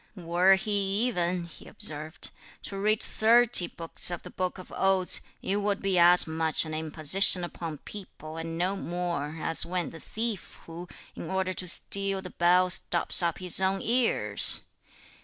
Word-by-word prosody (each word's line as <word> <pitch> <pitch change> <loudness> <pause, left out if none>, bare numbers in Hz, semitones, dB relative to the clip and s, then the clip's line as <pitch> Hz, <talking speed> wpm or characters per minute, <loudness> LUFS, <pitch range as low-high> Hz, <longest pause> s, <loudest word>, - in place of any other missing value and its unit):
"Were 180 +1 +2
he 200 +2 -1
even," 180 -6 -2
he 170 -2 -13
observed, 155 +1 -4 0.3
"to 195 - -8
read 210 +2 0
thirty 230 -4 +3
books 165 +1 -3
of 175 -1 -5
the - - -10
Book 185 0 -4
of 185 - -13
Odes, 190 -1 +3 0.2
it 195 - -1
would 205 0 -2
be 195 -2 0
as 175 +1 +6
much 160 0 +3
an 155 - -7
imposition 160 +4 +4
upon 165 -2 -7
people 160 -4 -11
and 165 0 -6
no 185 +3 -1
more, 170 -5 -5
as 165 - +2
(when 180 -1 -4
the 165 - -12
thief) 220 -1 -5
who, 170 +2 -10 0.3
in 165 - -8
order 190 0 -2
to 185 - -5
steal 195 +2 -1
the 185 -1 -10
bell, 180 +1 +2
stops 175 0 +2
up 170 -2 -2
his 180 0 +4
own 190 +1 0
ears! 240 0 +2
180 Hz, 165 wpm, -26 LUFS, 170-195 Hz, 0.3 s, as